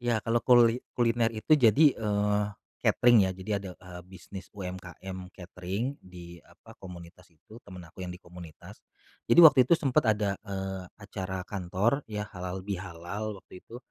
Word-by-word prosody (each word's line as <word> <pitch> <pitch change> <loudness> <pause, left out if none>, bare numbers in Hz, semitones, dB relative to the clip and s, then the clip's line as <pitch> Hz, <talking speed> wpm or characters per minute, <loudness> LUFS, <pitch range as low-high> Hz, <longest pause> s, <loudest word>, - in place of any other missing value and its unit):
Ya, 120 -1 0
kalau 115 +1 +1
kuli 120 -1 +5 0.2
kuliner 115 -1 +2
itu 110 +7 -1
jadi, 140 +3 +5
eee, 105 -1 0 0.4
catering 120 -6 +4
ya - - -2
jadi, 95 +3 -8
ada, 95 -2 -7
eee, 90 -1 -11
bisnis 95 +1 -11
UMKM 95 0 -8
catering 95 +9 -5
di 85 -2 -12
apa, - - -18
komunitas 90 -1 -12
itu 90 +8 -17
temen 90 -3 -11
aku 80 +3 -14
yang - - -6
di - - -9
komunitas. 85 -3 -13 0.5
Jadi 170 - +7
waktu 145 -4 +8
itu 170 - +6
sempet 135 -5 +2
ada, 105 -2 +1
eee, 95 -2 -5
acara 95 -3 -6
kantor 100 +7 -1
ya 105 -1 -4
halal 90 0 -6
bihalal 100 +2 -5
waktu 90 - -14
itu. 115 - -12
95 Hz, 160 wpm, -28 LUFS, 90-115 Hz, 0.5 s, waktu